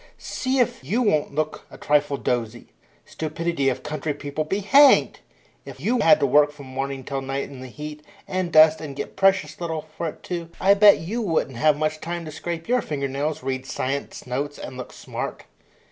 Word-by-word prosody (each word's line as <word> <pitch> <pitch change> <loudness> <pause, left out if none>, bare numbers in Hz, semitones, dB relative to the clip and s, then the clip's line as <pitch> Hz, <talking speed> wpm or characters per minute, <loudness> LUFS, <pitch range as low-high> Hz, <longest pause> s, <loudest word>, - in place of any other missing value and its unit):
See 260 +1 -2
if 245 - +1
you 215 - 0
won't 155 -9 +1
look 155 0 -2
a - - -12
trifle 145 -1 +1
dozy. 120 -2 -3 0.4
Stupidity 160 -2 -1
of 130 0 -4
country 150 0 -3
people 145 +1 -3
be 190 +7 -2
hanged! 275 +8 +6 0.4
If - - -11
you 245 +2 +1
had 205 - +6
to - - +4
work 145 +2 +4
from 145 -2 -12
morning 135 +1 -4
till 135 +1 -3
night 135 +1 -3
in 135 -2 -9
the 130 - -7
heat 150 +3 -8 0.3
and 185 -2 -2
dust, 155 0 +6
and 145 -3 -7
get - - -6
precious 190 -5 +2
little 160 -2 -3
for 170 - -3
it 155 - -8
too, 170 -2 -5
I 195 +1 +5
bet 205 0 +7
you 215 +9 -3
wouldn't 160 - -1
have 150 +4 +3
much 155 0 -1
time 170 0 -4
to 155 - -7
scrape 165 +1 -5
your 250 +1 +2
finger 140 -6 -3
nails, 140 +2 -3
read 130 0 -3
science 135 +2 -4
notes, 140 +4 -3
and - - -8
look 125 -1 -7
smart." - - -6
155 Hz, 200 wpm, -23 LUFS, 140-170 Hz, 0.4 s, bet